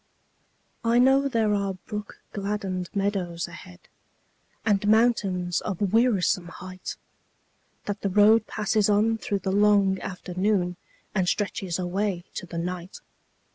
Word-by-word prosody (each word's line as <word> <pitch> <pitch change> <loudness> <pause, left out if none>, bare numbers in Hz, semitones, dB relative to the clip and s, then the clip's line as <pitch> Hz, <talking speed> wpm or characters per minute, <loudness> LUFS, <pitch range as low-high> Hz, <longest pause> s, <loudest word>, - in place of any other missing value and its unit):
I 230 +1 +3
know 270 +2 +5
there 225 -5 +1
are 200 -1 -1
brook 210 +3 -8
gladdened 195 -3 -3
meadows 195 -4 -1
ahead, 170 - -12 0.8
And 205 -2 +2
mountains 200 -6 +2
of 200 0 -2
wearisome 210 -6 +3
height; 185 +1 -8 0.9
That 205 -1 -4
the 200 - 0
road 210 +3 +5
passes 210 -1 +1
on 220 +2 +3
through 200 -2 -2
the 190 - +1
long 200 -1 +4
afternoon 185 0 -1 0.4
And 185 -3 +1
stretches 195 -4 -2
away 185 0 -1
to 185 - -6
the 170 - -6
night. 180 +2 -4
200 Hz, 125 wpm, -26 LUFS, 180-210 Hz, 0.9 s, know